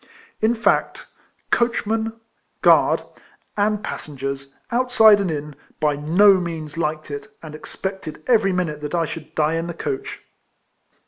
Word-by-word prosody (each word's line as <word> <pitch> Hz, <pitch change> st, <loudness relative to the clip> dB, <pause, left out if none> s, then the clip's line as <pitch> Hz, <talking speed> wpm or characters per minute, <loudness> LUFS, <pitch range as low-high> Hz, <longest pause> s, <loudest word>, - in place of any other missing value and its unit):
In 220 Hz, +2 st, +3 dB
fact, 230 Hz, -, +1 dB, 0.5 s
coachman, 225 Hz, -1 st, 0 dB, 0.4 s
guard, -, -, +5 dB, 0.5 s
and 210 Hz, 0 st, +1 dB
passengers, 135 Hz, -4 st, -6 dB, 0.2 s
outside 235 Hz, -4 st, +5 dB
and 195 Hz, -3 st, 0 dB
in, 150 Hz, -2 st, -4 dB, 0.2 s
by 150 Hz, -1 st, +2 dB
no 185 Hz, +7 st, +5 dB
means 165 Hz, -3 st, -5 dB
liked 155 Hz, -2 st, -2 dB
it, 145 Hz, +9 st, -7 dB
and 155 Hz, -2 st, -8 dB
expected 190 Hz, +1 st, -6 dB
every 220 Hz, -6 st, +3 dB
minute 170 Hz, -5 st, -2 dB
that 150 Hz, +3 st, -3 dB
I 165 Hz, -1 st, +1 dB
should 155 Hz, 0 st, -8 dB
die 155 Hz, 0 st, +2 dB
in 165 Hz, +1 st, -3 dB
the 170 Hz, -, -6 dB
coach. 410 Hz, -, -5 dB
170 Hz, 135 wpm, -22 LUFS, 150-215 Hz, 0.5 s, guard